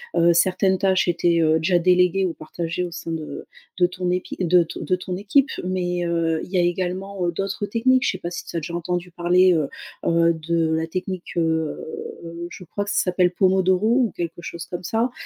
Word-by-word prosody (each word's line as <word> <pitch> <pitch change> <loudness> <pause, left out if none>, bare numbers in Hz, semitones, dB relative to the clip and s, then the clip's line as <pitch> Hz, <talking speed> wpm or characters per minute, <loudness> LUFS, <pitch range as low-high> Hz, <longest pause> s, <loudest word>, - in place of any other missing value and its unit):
heu, 170 0 +5
certaines 190 +2 +3
tâches 190 -2 +2
étaient, 170 0 +2
heu, 160 0 +3
déjà 175 +3 +2
déléguées 180 +2 +3
ou 175 - -1
partagées 165 +3 -4
au 175 - -4
sein 165 0 -6
de 155 -2 -5 0.3
de 180 - +6
ton 180 0 -3
épi 180 0 -2
de 180 -1 +4
t 160 - -8
de 185 - +1
ton 180 0 -5
équipe. 260 +9 +2
Mais, 180 -1 -1
heu, 165 -1 0
il - - -15
y 190 - +1
a - - +5
également, 185 +2 -2
heu, - - +1
d'autres 195 +3 -3
techniques. 255 +4 +2
Je - - +3
sais 185 - -5
pas 175 - -5
si 175 - -5
tu - - -9
as 170 - +1
déjà 170 +2 -5
entendu 175 +1 -3
parler, 180 +2 +4
heu 155 -4 0 0.4
heu, 170 0 +3
de 160 0 0
la 160 0 -1
technique, 185 +1 -5
heu. 160 -1 0 0.7
Je - - -9
crois 205 +5 -4
que 205 - -3
ça - - -1
s'appelle 180 -1 +2
Pomodoro 185 +2 +2
ou 240 -3 +3
quelque 170 0 -4
chose 170 0 -7
comme 175 +1 -6
ça, 230 +7 0
180 Hz, 215 wpm, -23 LUFS, 170-185 Hz, 0.7 s, de